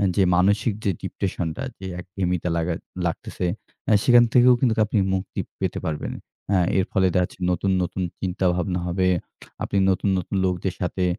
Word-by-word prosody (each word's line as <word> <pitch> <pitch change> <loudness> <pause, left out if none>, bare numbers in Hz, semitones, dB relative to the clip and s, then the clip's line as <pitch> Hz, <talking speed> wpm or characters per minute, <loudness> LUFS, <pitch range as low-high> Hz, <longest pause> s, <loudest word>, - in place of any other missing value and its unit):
যে, 100 - +4
মানসিক 100 +5 +3
যে, 100 - +2
ডিপ্রেশন 90 -3 -2
টা - - -5 0.2
যে, 95 - -7
একঘেয়ামিটা 90 -1 -2
লাগা 85 +1 0 0.3
লাগতেছে। 85 +1 -3 0.4
অ্যা 110 - +4
সেখান 120 -1 +7
থেকেও 125 0 +7
কিন্তু 120 -3 +3
আপনি 105 0 +1
মুক্তি 95 0 -3 0.2
পেতে - - -1
পারবেন। 80 -2 -3 0.4
আ - - +5 0.2
এর 95 - +2
ফলে 95 -2 +3
দেখাচ্ছে 90 0 0
নতুন, 95 +2 0
নতুন 90 +2 -3 0.2
চিন্তাভাবনা 90 -1 0
হবে। 90 +1 +1 0.6
আপনি 100 - -1
নতুন, 95 +1 +1
নতুন 90 +2 -3
লোকদের 90 0 -1
সাথে 90 +1 0
95 Hz, 160 wpm, -24 LUFS, 90-100 Hz, 0.6 s, সেখান